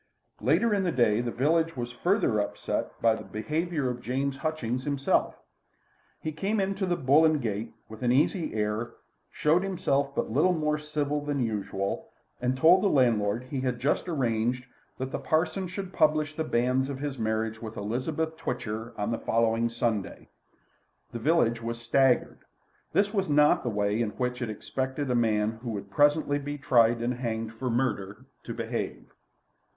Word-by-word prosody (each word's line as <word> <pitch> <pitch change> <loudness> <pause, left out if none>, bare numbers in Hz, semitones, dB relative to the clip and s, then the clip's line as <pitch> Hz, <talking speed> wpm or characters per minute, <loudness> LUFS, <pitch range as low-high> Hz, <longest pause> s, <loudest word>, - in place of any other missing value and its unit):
Later 170 - +3
in 200 - +2
the 180 -2 0
day 120 -5 +3
the 120 - -2
village 160 +6 +1
was 120 0 -3
further 150 - +1
upset 100 - -3
by 115 -1 +5
the 110 -1 -6
behaviour 150 +8 -2
of 125 -1 -3
James 135 +3 -2
Hutchings 130 -6 -2
himself. 140 -1 +1 0.8
He 155 - -3
came 195 +8 -1
into 195 0 -1
the 175 - +1
"Bull 145 +2 +4
and 155 -1 +4
Gate" 110 -2 -3
with 110 +1 -11
an 120 -1 +2
easy 150 - +1
air, 105 +2 -1 0.4
showed 160 +4 +2
himself 140 -8 0
but - - -1
little 155 +9 +3
more 150 -1 0
civil 150 -1 -2
than 145 -1 -2
usual, 100 -4 -2 0.3
and 125 +1 0
told 165 +7 +6
the 205 - +3
landlord 115 - +2
that 130 - -16
he 135 -2 -2
had 125 -2 -1
just 145 +7 0
arranged 125 -4 0 0.3
that 130 0 -4
the - - -3
parson 160 +4 0
should 185 +1 -6
publish 155 -1 +2
the 160 - -1
banns 130 0 +1
of 140 - -4
his 140 -2 -4
marriage 110 0 -1
with 110 -1 -7
Elizabeth 140 +10 -2
Twitcher 115 -4 -4
on 105 +2 -1
the 115 - -1
following 115 0 +1
Sunday. 115 -3 -2 0.8
The 120 - -5
village 120 -4 +2
was 115 0 -4
staggered. 125 +2 +2 0.5
This 205 +1 +2
was 195 -4 0
not 150 0 +5
the 120 - -2
way 105 +1 0
in 115 - 0
which 125 0 -2
it 120 - -2
expected 130 +5 -3
a - - +2
man 110 -2 +1
who 120 - -5
would 100 -2 -5
presently 145 +2 +3
be 145 +1 -5
tried 120 -4 +3
and 120 +1 0
hanged 115 -2 -3
for 125 +3 -3
murder 115 -2 -2 0.2
to - - -4
behave. - - -4
130 Hz, 175 wpm, -28 LUFS, 115-150 Hz, 0.8 s, told